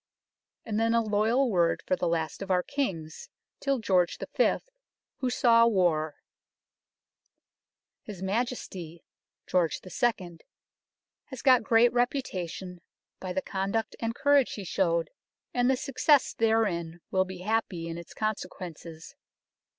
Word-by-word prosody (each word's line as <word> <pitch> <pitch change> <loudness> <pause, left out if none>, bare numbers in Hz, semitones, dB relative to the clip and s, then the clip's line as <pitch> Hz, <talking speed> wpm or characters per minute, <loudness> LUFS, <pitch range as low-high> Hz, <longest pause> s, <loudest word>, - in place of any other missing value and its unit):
And 215 -1 -1
then 230 +1 +2
a 230 - +4
loyal 220 +5 +2
word 170 -3 +2
for - - +1
the 180 - -1
last 165 0 -2
of 195 - -6
our 180 -1 +2
Kings 175 - -4 0.3
till 275 -1 0
George 185 -6 +1 0.2
V., - - +4 0.6
who 255 - -1
saw 230 -2 +5
war 165 -8 +1 1.3
" - - -64
His 205 -4 -7
Majesty 190 -6 -3 0.4
[George 175 -3 +1
II.] 185 -5 -1 0.9
has 260 -4 -9
got 255 -3 +6
great 230 +2 +4
reputation 190 - -2 0.4
by 185 - -5
the 190 +1 -2
conduct 200 +3 -2
and 230 0 -2
courage 285 -2 +3
he 205 - -6
showed, 170 -3 0 0.4
and 245 0 +2
the 265 - +3
success 280 +2 +2
therein 190 -7 0
will 190 0 +3
be 185 -1 -9
happy 195 -5 -1
in 165 0 -5
its 170 - -12
consequences. 175 - -5
195 Hz, 130 wpm, -28 LUFS, 175-235 Hz, 1.3 s, got